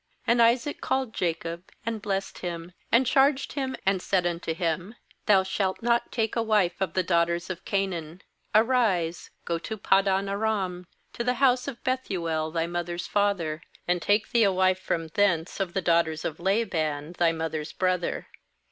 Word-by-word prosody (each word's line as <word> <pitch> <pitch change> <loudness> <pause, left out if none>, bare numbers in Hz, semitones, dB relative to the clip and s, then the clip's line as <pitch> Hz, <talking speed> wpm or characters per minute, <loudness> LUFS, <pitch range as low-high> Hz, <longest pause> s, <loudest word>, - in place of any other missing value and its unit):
OQ - - -49 0.3
And 235 0 +4
Isaac 240 +5 +2
called 260 -4 -1
Jacob, 170 +1 -3 0.2
aiid 225 -2 -2
blessed 195 -1 -3
him, 170 -1 -5 0.2
and 245 +3 +5
charged 270 +2 +3
him, 265 -2 -2
and 190 -1 +2
said 185 -2 +1
unto 170 -1 -2
him: 175 +6 -2 0.3
"Thou 195 -2 +6
shalt 190 +2 -2
not 235 0 +1
take 225 -3 -1
a 230 - +2
wife 210 -6 +2
of 185 -4 -1
the 185 - +2
daughters 170 0 +1
of 180 - -7
Ca 195 -1 +1
naan. 170 -2 -6 0.3
2Arise, 215 -8 +2 0.2
go 170 -1 -1
to 220 +6 -5
Paddan 195 0 +2
aram, 195 -3 -1 0.3
to 235 - -3
the 250 +1 +1
house 255 0 +3
of 255 -4 -6
Bethuel 175 -12 -1
thy 165 0 -1
mother's 175 0 -3
father; 185 -7 0 0.3
and 175 0 +1
take 205 +4 +1
thee 235 - +4
a 200 - +4
wife 185 0 +2
from 165 -3 -2
thence 175 -1 +1
of 185 -3 -2
the 190 - 0
daughters 165 -2 +2
of 160 - -3
Laban 170 -6 0
thy 170 -1 +4
mother's 160 -1 -3
brother. 185 -2 -1
185 Hz, 175 wpm, -27 LUFS, 170-220 Hz, 0.3 s, Thou